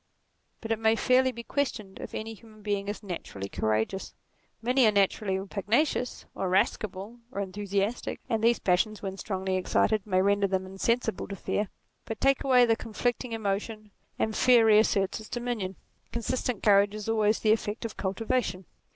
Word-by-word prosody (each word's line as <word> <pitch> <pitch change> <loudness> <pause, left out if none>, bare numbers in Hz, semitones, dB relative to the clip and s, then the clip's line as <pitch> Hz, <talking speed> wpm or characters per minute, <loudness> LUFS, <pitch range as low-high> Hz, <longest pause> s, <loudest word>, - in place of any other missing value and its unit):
But 225 - -5
it 225 - +1
may 220 0 +3
fairly 255 +2 +3
be 235 -1 -8
questioned 225 -8 -3
if - - -7
any 225 +1 -4
human 215 -1 -16
being 200 -1 -1
is 205 +1 -5
naturally 165 - -6
courageous. 110 - -1 0.4
Many 250 +1 +3
are - - +5
natu 200 0 +2
rally 190 -1 -2
pugnacious, 235 +6 0
or - - -3
irascible, 195 +3 0
or 200 - -4
enthusiastic, 200 +3 -2
and 225 -3 -1
these 235 +1 +5
passions 205 +4 +1
when 190 -1 -3
strongly 190 -2 -2
excited 210 +3 +1
may 185 -2 +2
render 200 +1 +3
them 190 -1 -1
in 190 +1 -11
sensible 235 -3 0
to 200 - -5
fear. 205 +2 -2 0.4
But 225 - -5
take 275 0 +3
away 255 -3 +6
the 225 -1 +3
conflicting 240 +2 -2
emotion, 215 0 -3 0.3
and 220 -1 -1
fear 245 -3 +5
reasserts 210 -2 +3
its 215 - -11
dominion: 240 -6 -3 0.4
consistent 235 -1 -2
courage 205 0 +5
is 215 0 -6
always 215 -1 +2
the 215 - +4
effect 220 +1 -1
of 225 - -5
cultivation. 195 -1 -1
215 Hz, 170 wpm, -28 LUFS, 195-230 Hz, 0.4 s, away